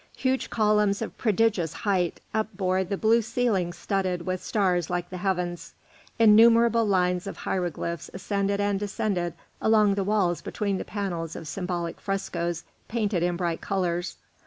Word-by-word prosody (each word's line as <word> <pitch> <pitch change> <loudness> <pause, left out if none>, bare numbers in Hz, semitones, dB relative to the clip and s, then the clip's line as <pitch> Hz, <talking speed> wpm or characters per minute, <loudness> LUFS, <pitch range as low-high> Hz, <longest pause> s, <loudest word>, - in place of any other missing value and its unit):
Huge 260 0 0
columns 210 -2 +2
of - - -7
prodigious 210 -7 +1
height 185 -5 -1
upbore 190 -4 0
the 195 +2 -3
blue 225 +3 +4
ceiling 220 -6 0
studded 185 -2 -2
with 185 0 -2
stars 180 -5 +1
like 175 0 -2
the 185 - -5
heavens; 180 -2 -2 0.4
innumerable 230 +1 +6
lines 180 -1 +1
of - - -6
hieroglyphs 170 -3 -3
ascended 200 +1 -1
and 205 -1 +1
descended 195 -4 -2 0.3
along 215 -2 +4
the 200 0 0
walls 190 -4 +1
between 200 -4 -2
the - - -5
panels 175 -6 -4
of 160 - -7
symbolic 175 -1 -3
frescoes 175 -4 -2 0.2
painted 210 -6 0
in 175 0 0
bright 170 -2 -2
colours. 175 -2 -2
195 Hz, 145 wpm, -26 LUFS, 175-210 Hz, 0.4 s, innumerable